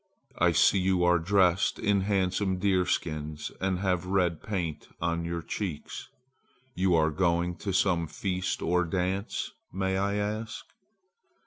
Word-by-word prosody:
I - - +4
see 100 - +4
you 95 -1 +2
are 90 0 +4
dressed 95 +1 +2
in 100 -1 +2
handsome 95 -1 0
deerskins 80 -6 -1
and 95 -1 +1
have 90 -2 0
red 90 -4 +1
paint 90 -7 -3
on 85 0 -1
your 85 -1 -3
cheeks. 85 -4 -5 0.6
You 95 -4 +2
are 80 -1 +3
going 85 +1 +1
to 100 - -3
some 90 -3 +2
feast 90 +3 -2
or 90 +1 +2
dance, 95 +4 -2 0.2
may 95 0 -1
I 100 +1 0
ask?" 110 +2 -3
90 Hz, 135 wpm, -28 LUFS, 85-95 Hz, 0.6 s, I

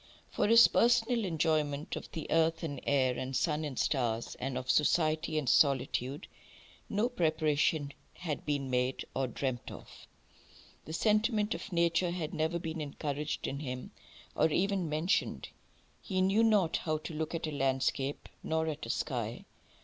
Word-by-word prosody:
THREE. - - -19
For - - +2
his 230 +1 +8
personal 235 -1 +3
enjoyment 155 -3 0
of - - -7
the 160 - -5
earth 165 0 +2
and 145 -5 -4
air 130 -3 +3
and 130 +1 -4
sun 150 +4 0
and 145 -4 -5
stars, 120 -5 0
and 130 0 -3
of 130 0 -5
society 155 +2 +2
and 150 -4 -1
solitude, 135 0 +2 0.6
no 210 +4 +1
preparation 155 - +1 0.2
had 160 -5 -4
been 140 -3 -2
made, 125 +1 0
or 130 0 0
dreamt 125 0 -3
of. - - -12 0.8
The 160 - -7
sentiment 215 +3 +2
of 210 - -7
nature 170 +1 +2
had 170 -3 -4
never 160 +2 0
been 165 -2 -4
encouraged 145 0 -3
in 140 - -3
him, 125 -3 -5 0.4
or - - +3
even 185 +1 0
mentioned. 155 +5 0 0.5
He 190 -3 -2
knew 195 +4 +3
not 210 -7 +3
how 155 -1 -1
to 155 +1 -7
look 155 +2 -3
at 165 - -2
a 155 - -3
landscape 135 0 -1
nor 160 0 0
at 155 -2 -4
a - - -8
sky. - - -3
155 Hz, 160 wpm, -31 LUFS, 140-170 Hz, 0.8 s, his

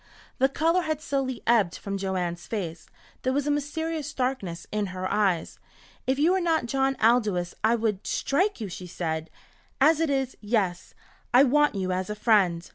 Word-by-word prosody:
The 265 - +4
colour 330 +6 +2
had 310 -3 -2
slowly 270 -4 -2
ebbed 215 -7 +3
from 200 -1 -4
Joanne's 180 -3 -3
face. 175 -7 -4 0.3
There 260 - 0
was 280 +1 0
a 295 - +1
mysterious 305 +1 -2
darkness 250 -10 -2
in 210 -1 -1
her 185 0 -4
eyes. 195 -5 0 0.5
"If 260 +1 +2
you 310 +5 +4
were 380 0 +2
not 325 -6 +1
John 270 +2 +1
Aldous 215 -7 +2
I 225 +2 +4
would 215 -4 -2
strike 375 +7 0
you," 215 - -4
she 180 0 -8
said. 160 -2 -3 0.5
"As 305 +3 +5
it 325 -2 +1
is 270 -2 -1
yes 205 -5 -1 0.4
I 260 - +8
want 295 -1 +3
you 185 -1 -1
as 185 +1 -2
a 210 - -3
friend." 195 -6 +2
230 Hz, 180 wpm, -26 LUFS, 185-280 Hz, 0.5 s, I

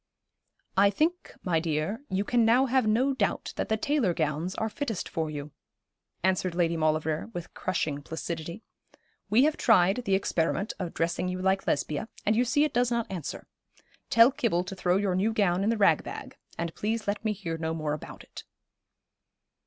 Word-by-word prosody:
'I 200 +1 +6
think, 320 - -1
my 170 -3 +1
dear, 160 - -2
you 190 +1 0
can 240 +2 +2
now 240 +4 +5
have 260 -3 +2
no 250 +6 +3
doubt 215 -7 -1
that - - -3
the 220 - +2
tailor 230 - +1
gowns 155 +4 -1
are 220 - -1
fittest 225 -3 -3
for 160 -1 -2
you,' 145 0 -6 0.7
answered 185 -1 +1
Lady 170 -1 +2
Maulevrier, 155 +2 0
with 175 -1 -6
crushing 155 -6 -2
placidity. 165 +5 -5 0.7
'We 225 +6 +5
have 305 +1 +2
tried 195 -3 +4
the 195 - +3
experiment 190 +1 0
of 180 -3 -4
dressing 170 +2 0
you 180 0 -3
like 190 +1 +1
Lesbia, 150 +8 -1 0.2
and 215 - +3
you 245 +3 +3
see 290 +5 +3
it 300 - 0
does 245 0 +2
not 235 -3 -1
answer. 175 -6 -5 0.6
Tell 230 +3 +7
Kibble 215 -10 0
to 185 +1 -7
throw 180 0 +2
your 200 -2 0
new 195 +5 +1
gown 195 -3 +2
in 210 - +2
the 230 - +1
rag 205 - +4
bag, - - -8 0.2
and 170 -1 -3
please 220 +1 -2
let 205 +1 -1
me 215 - +1
hear 175 -6 -4
no 160 0 -2
more 155 -2 -2
about 150 - -8
it.' - - -11
190 Hz, 185 wpm, -28 LUFS, 165-225 Hz, 0.7 s, Tell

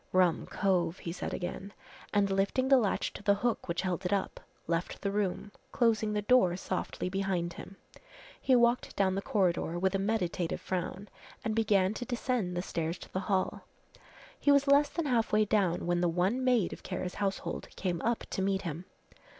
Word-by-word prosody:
"Rum 180 -3 +3
cove," 180 -3 0
he 165 - -5
said 175 - -4
again, 190 +2 -5 0.4
and 200 -1 +2
lifting 200 +7 +1
the 270 -2 +7
latch 210 -5 0
to - - -8
the 205 -1 +3
hook 235 +3 -1
which 170 +1 -1
held 185 -1 -2
it 180 - -2
up, 200 -2 -1 0.3
left 170 +1 -2
the 200 - 0
room, 205 0 -2 0.2
closing 225 -3 +2
the 210 0 -1
door 200 -6 +4
softly 185 -1 -3
behind 185 -3 -1
him. 195 - -10 0.7
He 260 - +4
walked 240 0 +2
down 190 -1 +2
the 195 - -1
corridor, 175 -4 0
with 190 +2 +1
a 195 - +1
meditative 190 -5 -1
frown, 185 +2 -4 0.4
and 220 - 0
began 210 -3 +2
to 245 - -5
descend 240 -7 -1
the 175 - -1
stairs 165 -1 -2
to - - -13
the 185 - 0
hall. 190 -2 0 0.8
He 285 - +4
was 280 0 +5
less 285 +1 +5
than 335 - -3
half 240 -5 +1
way 215 0 +4
down 190 -5 +1
when 175 0 +1
the 175 - +3
one 185 +9 +1
maid 245 -7 +2
of - - -10
Kara's 185 -1 -4
household 195 -1 -2
came 175 -3 -2
up 235 0 0
to - - -1
meet 195 0 0
him. 170 +1 -5
195 Hz, 190 wpm, -31 LUFS, 180-220 Hz, 0.8 s, the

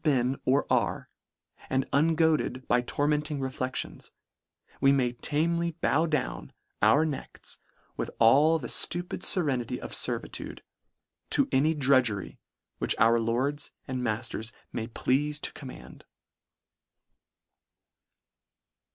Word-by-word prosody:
99 140 -6 +3
been 135 - -6
or 135 +3 +3
are, - - 0 0.6
and 130 0 0
ungoaded 155 -3 +2
by 120 - +3
tormenting 150 +3 -1
reflections, 130 -1 -4 0.7
we 135 0 +5
may 130 -3 +2
tamely 170 +6 0
bow 160 +4 +2
down 150 -4 -2 0.3
our 155 +3 +5
necks 150 -4 -5 0.4
with - - -2
all 145 +8 +5
the 130 -7 -6
ftupid 175 +7 0
ferenity 130 -8 0
of - - -7
fervitude, - - -3 0.7
to - - +3
any 150 +5 +3
drudgery, 130 -8 +1 0.4
which - - +1
our 115 +1 +5
lords 130 +6 -1 0.2
and 130 -1 -3
ma 110 -3 +1
ilers 115 -1 -4 0.2
may 110 -1 -3
pleafe 145 +5 0
to - - -3
command. 135 -3 -11
135 Hz, 115 wpm, -28 LUFS, 125-150 Hz, 0.7 s, we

